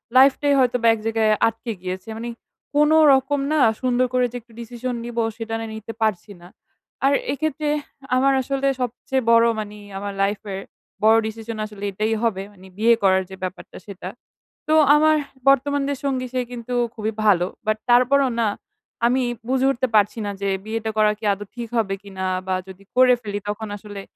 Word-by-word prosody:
লাইফটাই 275 +2 +5
হয়তোবা 245 -2 +2
এক 225 - -4
জায়গায় 220 -1 +2 0.2
আটকে 225 +1 -4
গিয়েছে. 185 +2 -5
মানে 235 +1 -5 0.5
কোন 300 +1 +5 0.2
রকম 270 +2 +1
না 310 - +2 0.2
সুন্দর 255 0 +2
করে 250 0 +3
যে 245 - -10
একটু 230 0 -23 0.5
নিবো 235 -1 -2
সেটা 225 -1 -5
না 225 - -4
নিতে 220 +1 -7
পারছি 210 -2 0
না। 175 - -13 0.6
আর 280 - +4 0.2
এক্ষেত্রে, 300 +1 -2 0.5
আমার 270 +2 +3
আসলে 275 +1 -1
সবচেয়ে 250 +2 -2
বড় 230 0 +6
মানে 210 0 -6 0.2
আমার 200 0 -4
লাইফের, 200 -1 -2 0.4
বড় 220 +1 +6
decision 220 0 -6
আসলে 210 -1 -10
এটাই 215 +3 -1
হবে 200 -5 0
মানে 190 -1 -16
বিয়ে 230 +2 +5
করার 190 -1 +4
যে 190 - -8
ব্যাপারটা 185 0 -6
সেটা। 200 -2 -7 0.6
তো 310 - +2 0.2
আমার 310 +1 +4 0.3
বর্তমান 280 +1 +3
যে 285 - 0
সঙ্গী 260 -2 -1
সে 255 - 0
কিন্তু 245 0 -6 0.2
খুবই 220 0 -2
ভালো। 180 -4 +4 0.2
বাট 215 0 +1
তারপরও 255 +3 +4
না, 220 - +2 0.6
আমি 255 +2 +2 0.3
বুঝে 260 0 +2
উঠতে 260 0 -1
পারছি 210 +2 +3
না - - -2
যে 200 - -1 0.2
বিয়েটা 220 0 -3
করা 215 -1 +4
কি 220 - -19
আদৌ 205 +1 -7
ঠিক 235 -1 -6
হবে 200 -4 +1
কিনা? 190 -2 -6 0.2
বা 185 - +1
যদি 190 +1 -12
করে 255 0 +6
ফেলি 205 -2 -4
তখন 215 +1 -4
আসলে, 205 -1 -9
225 Hz, 175 wpm, -22 LUFS, 205-255 Hz, 0.6 s, বড়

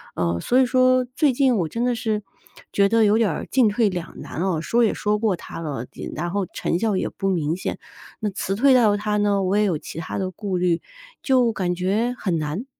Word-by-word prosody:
呃， 85 -1 0
所 250 - +2
以 260 - +5
说 255 0 +3
最 295 -3 +3
近 260 -2 +3
我 170 -4 0
真 230 +8 -3
的 245 -1 +1
是 220 -2 -1 0.5
觉 200 0 +4
得 225 0 +4
有 210 +2 +4
点 225 -4 +2
儿 160 - -4
进 255 -4 +4
退 210 0 +2
两 175 -3 -6
难 165 - -6
啊， 180 -5 0
说 235 +8 +2
也 220 - +2
说 210 0 0
过 210 -4 +1
他 165 - -9
了， 145 -7 -4
呃， - - -24 0.3
然 175 +3 -3
后 200 -1 -1
成 170 - -1
效 220 -3 +1
也 - - -1
不 195 -1 -3
明 165 -3 0
显， 185 - -4 0.4
那 215 -2 -1
辞 195 0 -3
退 265 +4 +5
到 220 -5 +5
他 210 0 -1
呢， 205 -1 +2
我 190 +2 +1
也 210 - +3
有 180 -7 +1
其 160 - -8
它 160 - -5
的 190 -1 -2
顾 190 0 -3
虑， 175 -1 +1 0.4
就 255 -4 +3
感 180 -4 -1
觉 205 +7 0
很 175 -5 0
难。 155 - -3
205 Hz, 255 characters per minute, -23 LUFS, 175-230 Hz, 0.5 s, 以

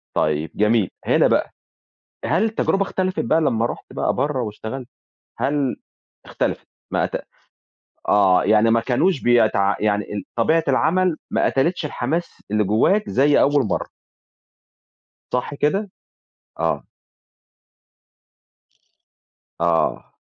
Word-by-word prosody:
طيَب 75 +1 0
جميل، 105 -2 +2 0.2
هنا - - +4
بقى، - - +1 0.7
هل 195 - +2
التجربة 215 -3 0
اختلفت 185 -1 -2
بقى 160 +8 +2
لمّا 115 -6 +1
رُحت - - -5
بقى - - 0
برّه 140 -2 -1
واشتغلت؟ 115 +3 -6 0.5
هل 140 -2 0 0.5
اختلفت، - - -3 0.3
ما - - +1
أت - - -3 1.0
آه، 95 -3 +4
يعني 110 +2 +4
ما 115 - +4
كانوش 135 +7 +1
بيتع 110 -5 +3
يعني 105 -1 -1
ال 100 -2 -4
طبيعة 160 +8 +3
العمل 170 +5 +2
ما - - +1
قتلِتش 160 +5 0
الحماس 150 +5 -3
اللي 105 0 +2
جوّاك 150 - +2
زي 145 +2 +3
أول 145 -1 +3
مرّة. 100 - -2 1.5
صح 125 +3 -1
كده؟ 195 +9 0 0.7
آه. - - -1 2.8
آه. 85 -1 0
125 Hz, 110 wpm, -21 LUFS, 105-160 Hz, 2.8 s, هنا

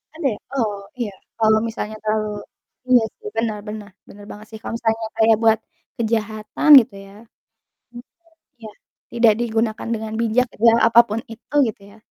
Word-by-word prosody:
Ada 315 -4 -1
ya? - - -15 0.2
Oh, 210 -4 -1 0.2
iya 220 -4 -2 0.3
kalau 220 -1 +4
misalnya 220 -1 -5
terlalu 215 0 -1 0.6
iya 250 -2 +6 0.2
sih 435 -1 -10
benar 225 -2 -1
benar 210 -1 -7 0.2
benar 205 0 -13
banget 210 +1 -11
sih, 220 - -8
kalau - - -6
misalnya 225 -1 -1
kayak 225 0 +5
buat 220 0 +4 0.4
kejahatan 220 +2 -2
gitu 210 - -10
ya 195 - -16 0.8
mhm, 240 0 -11 0.6
iya, 220 - -9 0.4
tidak 230 -2 +4
digunakan 225 -2 -2
dengan 220 -1 -5
bijak 235 +2 +2
gitu 220 - -11
ya, - - +4
apapun 230 -1 +4
itu 225 +5 -14
gitu 210 -2 -7
ya 215 - -18
220 Hz, 165 wpm, -20 LUFS, 215-230 Hz, 0.8 s, iya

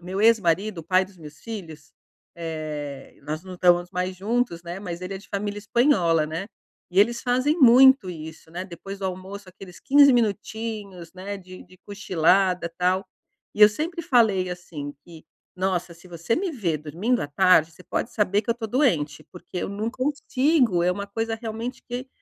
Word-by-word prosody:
meu 185 +3 -4
ex-marido, 205 -3 +3
o - - -5
pai 185 +3 +3
dos 185 -1 -18
meus 150 -2 -12
filhos, 160 -10 -9 0.4
eh, 155 -4 -6
nós 155 +4 -5
não 185 - -8
estamos 175 0 +3
mais 180 +1 -2
juntos, 210 -3 -1
né, 175 +2 -7
mas 175 -4 -6
ele 185 +2 -5
é - - -5
de 200 - -17
família 205 +1 -3
espanhola, 200 - +2
né. 165 +5 -4 0.4
E 185 - 0
eles 235 +3 +2
fazem 255 +6 +1
muito 260 -4 +7
isso, 160 -1 -10
né, 180 +3 -5
depois 195 +2 -9
do 195 - -6
almoço 190 +2 -7
aqueles 185 -1 -12
15 280 +1 +6
minutinhos, 210 -5 -2
né, 195 +2 -6
de 185 -1 -12
de 185 - -19
cochilada, 185 -2 +1
tal. 185 +2 +1 0.5
E 210 - -6
eu 210 - +11
sempre 320 - -4
falei 215 -9 +3
assim, 155 -5 -7
que: 165 -2 -13 0.3
"Nossa, 185 -2 -1
se 175 +2 -17
você 175 +6 -2
me 375 0 -1
ver 175 - -1
dormindo 180 - -1
à - - -3
tarde, 165 0 +4
você 170 - -16
pode 235 - -3
saber 205 -2 +2
que 225 - -26
eu - - +2
tô 230 -2 -5
doente", 165 - +1
porque 180 0 -8
eu - - -3
não 210 +3 -3
consigo, 260 - +1
é 180 - +3
uma 200 +2 -5
coisa, 225 +2 -2
realmente, 225 +2 -6
que 250 +2 -5
190 Hz, 185 wpm, -24 LUFS, 170-225 Hz, 0.5 s, eu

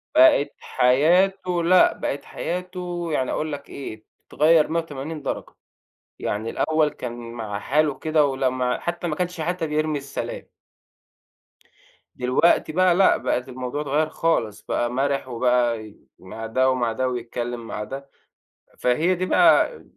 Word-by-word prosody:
بَقِت 130 +2 +5
حياته 175 +7 +2
لأ 180 +2 +5
بَقِت 140 0 -4
حياته، 180 -1 -4
يعني 130 -3 0
أقول 155 0 -2
لك 140 0 -8
إيه، 110 -6 -8 0.2
اتغير 155 0 +4
180 155 -2 -4
درجة. - - -5 0.6
يعني 110 +2 -3
الأول 155 -1 +1
كان 120 -4 -7
مع 105 -3 -5
حاله 150 0 +1
كده 155 -1 +2
ولمّا 130 -2 0
حتى 175 0 -3
ما 155 - -2
كانش 180 -1 -3
حتى 175 0 -2
بيرمي 155 0 0
السلام. 140 0 -6 1.6
دلوقتي 130 +6 +2
بقى 180 +1 +3
لأ، 190 0 +5
بقت 125 0 -2
الموضوع 130 +3 -4
اتغير 150 +2 0
خالص، 115 -12 -1
بقى 120 - -1
مرِح 135 +2 -1
وبقى 120 -2 +1
ي 105 - -15 0.2
مع 110 +4 -8
ده 130 +4 +2
ومع 125 -3 0
ده 130 +3 -1
ويتكلم 120 -1 -4
مع 105 - -4
ده. 135 +3 -8 0.7
فهي 155 +9 +2
دي 185 +1 -2
بقى 475 - +4
140 Hz, 140 wpm, -23 LUFS, 125-165 Hz, 1.6 s, بَقِت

